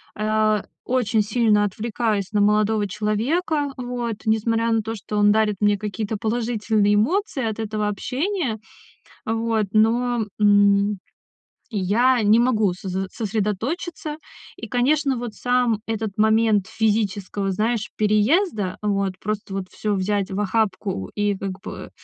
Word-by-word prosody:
А, 215 -1 +1 0.2
очень 235 -4 +1
сильно 215 -1 +2
отвлекаюсь 210 -1 -2
на 210 - +2
молодого 210 0 +2
человека, 270 - -1
вот, 245 -2 -3
несмотря 225 +1 +1
на 225 -1 +2
то, 225 +2 -4
что 210 0 -5
он 205 0 +5
дарит 215 -1 +2
мне 205 0 +3
какие-то 210 +1 -4
положительные 220 -2 +1
эмоции 270 - 0
от 220 -1 -3
этого 215 -1 -2
общения. 260 - -2 0.7
Вот, 225 -1 0
но, 230 +1 +2
м, 205 0 +4 0.7
я 230 +5 +2
не 215 +2 +5
могу 220 -6 +2
сос 185 +1 -6
э, 190 0 -1
сосредоточиться. 230 - -3 0.4
И, - - -8
конечно, 270 +2 +1
вот 235 -2 -5
сам 245 -2 +1
этот 220 -2 -3
момент 220 -2 +3
физического, 205 -2 -1
знаешь, 220 +3 -1
переезда, 215 - +2
вот, 200 -2 -1
просто 210 -1 -4
вот 195 -1 -3
всё 210 -1 -2
взять 200 +1 -1
в 190 - -2
охапку 195 - -1
и, 205 -1 +1
как 190 -1 -5
бы, - - -7 0.2
э, - - -16
215 Hz, 135 wpm, -22 LUFS, 205-235 Hz, 0.7 s, он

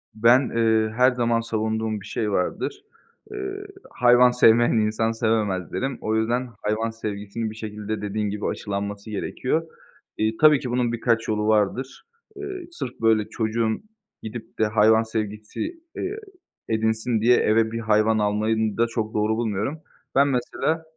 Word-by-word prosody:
Ben, 120 +4 +4
eee, 110 -1 +3
her 125 +1 +5
zaman 120 -1 +1
savunduğum 110 -1 -2
bir - - -12
şey 105 -2 -2
vardır. 390 - -2 0.5
Iıı, 400 0 -5 0.2
hayvan 125 0 +5
sevmeyen, 120 -1 +5
insan 110 +1 +1
sevemez 110 -6 0
derim. 135 -1 -2
O 110 0 -1
yüzden, 120 +3 0
hayvan 110 +2 0
sevgisinin 110 0 -4
bir - - -11
şekilde, 105 -1 -5
dediğin 105 0 -2
gibi, 105 +1 -4
aşılanması 100 +1 -4
gerekiyor. 130 +9 -2 0.5
İii, 110 +1 0
tabii 150 -3 +6
ki 125 - -5
bunun 120 -1 +1
birkaç 115 -1 0
yolu 105 0 0
vardır. 110 +5 0 0.3
Eee, 390 -3 -6
sırf 125 - -7
böyle 110 -2 +3
çocuğun 110 - -1 0.4
gidip 110 0 -8
de 110 - +4
hayvan 110 +1 +4
sevgisi, 105 -1 -5 0.4
eee, 400 +3 -3 0.5
edinsin 110 0 0
diye 120 +2 +5
eve 110 +1 +2
bir 115 - -3
hayvan 110 0 +2
almayı 105 +2 +1
n 110 -1 -1
da 115 0 +3
çok 110 -2 -3
doğru 110 +1 +1
bulmuyorum. 115 +7 -2 0.3
Ben 140 +1 +5
mesela, 140 +5 -1
110 Hz, 150 wpm, -24 LUFS, 110-120 Hz, 0.5 s, tabii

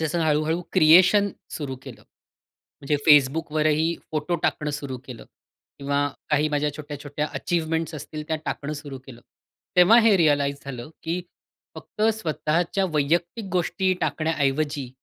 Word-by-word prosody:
जसं 160 +2 -1
हळूहळू 155 +2 +1
क्रिएशन 185 +4 +6 0.2
सुरू 135 -4 -5
केलं. - - -11 0.8
म्हणजे 145 +1 0
Facebookवरही 155 +2 +3 0.2
फोटो 155 +3 -1
टाकणं 150 -1 0
सुरु 140 -3 -5
केलं, 125 -3 -10 0.5
किंवा 140 +1 0 0.2
काही 150 +1 +2
माझ्या 150 0 0
छोट्या-छोट्या 145 0 -5
अचीवमेंट्स 160 -1 -1
असतील 150 +1 -7
त्या 160 - 0
टाकणं 150 +1 -3
सुरु 145 -3 -7
केलं, 120 -3 -12 0.6
तेव्हा 180 +7 +7
हे 220 -3 +5
रियलाइज 145 -4 +2
झालं, 130 +1 -7
की 170 +2 -2 0.5
फक्त 210 - -7
स्वतःच्या 170 0 -1
वैयक्तिक 170 +9 0
गोष्टी 185 +1 +1
टाकण्याऐवजी 145 -3 -1
155 Hz, 125 wpm, -24 LUFS, 145-165 Hz, 0.8 s, तेव्हा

